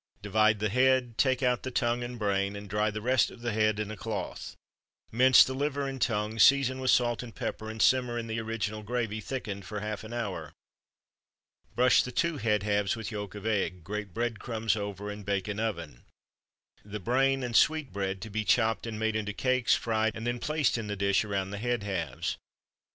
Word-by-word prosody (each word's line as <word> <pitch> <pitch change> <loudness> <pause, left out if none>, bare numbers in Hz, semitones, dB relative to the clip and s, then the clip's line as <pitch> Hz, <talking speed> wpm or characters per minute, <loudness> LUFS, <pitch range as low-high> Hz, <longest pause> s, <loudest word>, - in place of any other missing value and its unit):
Divide 110 +1 +3
the 105 +1 -1
head, 125 0 +2
take 130 -1 +2
out 125 -1 +2
the 130 - -4
tongue 120 -1 0
and 120 0 -6
brain, 100 -2 0
and 100 0 -8
dry 105 +2 +1
the 110 0 -5
rest 130 +1 +3
of - - -13
the 120 0 -1
head 110 -1 +1
in 105 0 -3
a - - -5
cloth. 110 0 -5 0.6
Mince 130 +3 +7
the 130 - -3
liver 140 +1 -1
and 135 -2 -5
tongue, 110 -2 0
season 135 -1 +5
with 130 -1 -1
salt 120 -1 +3
and 115 -4 -10
pepper, 110 - -4
and 110 0 -7
simmer 125 0 +3
in 115 - -3
the 115 0 -3
original 110 -1 -3
gravy 110 -1 -2
(thickened) 105 -7 -5
for 105 +2 -5
half 105 0 -4
an 110 - -9
hour. 115 -5 -4 1.2
Brush 125 +1 +5
the 125 - -5
two 170 +4 0
head 105 -6 +1
halves 105 -1 +1
with 115 0 -6
yolk 105 -1 -5
of 105 0 -8
egg, 95 -5 -1
grate 105 +2 -5
bread 115 +2 -2
crumbs 110 -3 -1
over, 105 -1 -4
and 105 0 -8
bake 100 -1 -1
in 105 0 -3
oven. 85 - -4 0.8
The 105 +1 -6
brain 135 +5 +1
and 120 -2 -3
sweetbread 100 -11 +1
to 110 - -8
be 110 +1 -1
chopped 115 +1 +2
and 110 -2 -4
made 110 0 0
into 105 -1 -2
cakes, 130 +1 +2
fried, 110 -1 0
and 115 - -6
then 120 0 -1
placed 150 -3 +1
in 110 - -5
the 105 - -3
dish 100 0 +2
around 100 -2 -2
the 100 - -5
head 120 -1 -1
halves. 85 -10 -3
110 Hz, 205 wpm, -29 LUFS, 105-120 Hz, 1.2 s, Mince